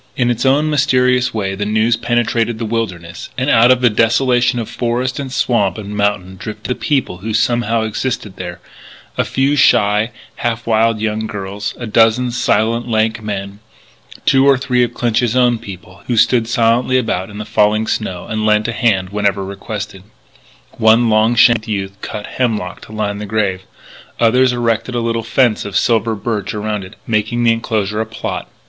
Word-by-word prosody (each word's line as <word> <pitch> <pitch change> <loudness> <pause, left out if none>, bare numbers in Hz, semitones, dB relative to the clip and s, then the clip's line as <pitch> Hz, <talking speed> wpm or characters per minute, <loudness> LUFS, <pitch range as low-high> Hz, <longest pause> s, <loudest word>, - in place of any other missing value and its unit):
In 120 -1 +2
its 120 +2 0
own 145 +3 +3
mysterious 130 -4 +2
way 100 -4 -2
the 100 +1 -3
news 110 +2 +2
penetrated 120 0 0
the 115 - -3
wilderness; 95 -7 -4
and 130 +3 +1
out 115 +2 +5
of 130 -1 +4
the 125 - +5
desolation 120 +3 +2
of 115 -2 -3
forest 125 +2 -2
and 135 -2 -5
swamp 105 -8 +1
and 105 -1 -6
mountain 100 -2 -1
drifted 110 +4 -6
the - - +3
people 130 -9 -1
who 110 +3 -3
somehow 115 -1 +1
existed 110 -2 -3
there 90 -2 -7 0.6
a - - +1
few 135 +2 0
shy, 105 -5 +3 0.3
half 115 -1 -2
wild 115 0 +2
young 110 0 -2
girls, 100 0 -5
a 120 - -6
dozen 115 +3 +3
silent, 115 0 0
lank 110 -1 0
men, 100 -1 -5 0.7
two 135 0 +4
or 140 -1 +5
three 125 -2 0
of 120 - 0
Clinch's 120 0 0
own 120 -2 +3
people, 95 -1 -11
who 120 - 0
stood 115 0 +3
silently 120 +2 +2
about 95 -7 -1
in 105 - -10
the 105 - -5
falling 105 +1 +2
snow 95 -5 -3
and 110 0 -3
lent 105 0 +2
a 120 - -2
hand 95 -7 +1
whenever 100 -1 0
requested. 100 0 -6 0.8
One 110 +1 +4
long 110 +2 +3
shanked 115 -1 +4
youth 100 -2 -3
cut 105 -1 -6
hemlock 110 -7 -2
to - - -14
line 105 -2 -3
the 105 - -6
grave; 100 -3 -1 0.6
others 125 +2 +4
erected 120 0 -1
a - - +1
little 115 0 -1
fence 115 -1 +1
of 100 -1 -2
silver 115 0 +1
birch 105 -1 -3
around 105 -1 -3
it, 95 +3 -12
making 110 +2 0
of - - +1
the 115 - +5
enclosure 110 -2 -2
a 110 - -3
"plot." 110 - -5
110 Hz, 180 wpm, -16 LUFS, 105-120 Hz, 0.8 s, out